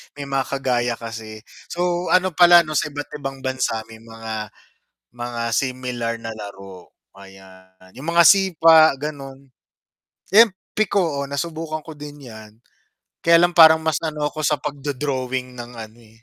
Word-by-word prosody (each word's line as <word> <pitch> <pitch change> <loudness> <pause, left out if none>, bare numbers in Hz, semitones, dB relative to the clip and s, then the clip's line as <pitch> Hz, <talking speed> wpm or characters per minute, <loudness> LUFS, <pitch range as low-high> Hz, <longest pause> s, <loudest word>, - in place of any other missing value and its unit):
may 140 -1 -8
mga 135 -1 -1
kagaya 125 -3 -1
kasi. 110 -2 -9 0.3
So 175 0 -1
ano 185 +1 +3
pala 175 +1 +7
'no, 155 -2 -3
sa - - 0
iba't 145 0 -6
ibang 135 -1 -7
bansa 130 -4 -2
may 110 - -12
mga, 110 -1 -8 0.6
mga 120 -1 -6
similar 125 -2 -2
na 115 - -5
laro, 95 -4 -11 0.2
ayan. 95 -1 -17
Yung 140 - -9
mga 170 0 +5
sipa 165 -4 +6
gano'n. 135 -2 -8 0.8
'Yan 225 +2 +7 0.3
piko, 180 -9 0
oh, - - -7
nasubukan 155 +2 -4
ko 160 -2 -10
din 145 -2 -11
yan. 110 -2 -12 0.7
Kaya 170 0 +5
lang 175 0 +2
parang 160 -1 +8
mas 160 -2 0
ano 150 -2 -2
ko 155 - -6
sa 150 -1 +1
pagdo-drawing 135 -3 -4
ng 120 +1 -8
ano, 110 0 -10
eh, 110 -1 -21
135 Hz, 150 wpm, -21 LUFS, 115-160 Hz, 0.8 s, parang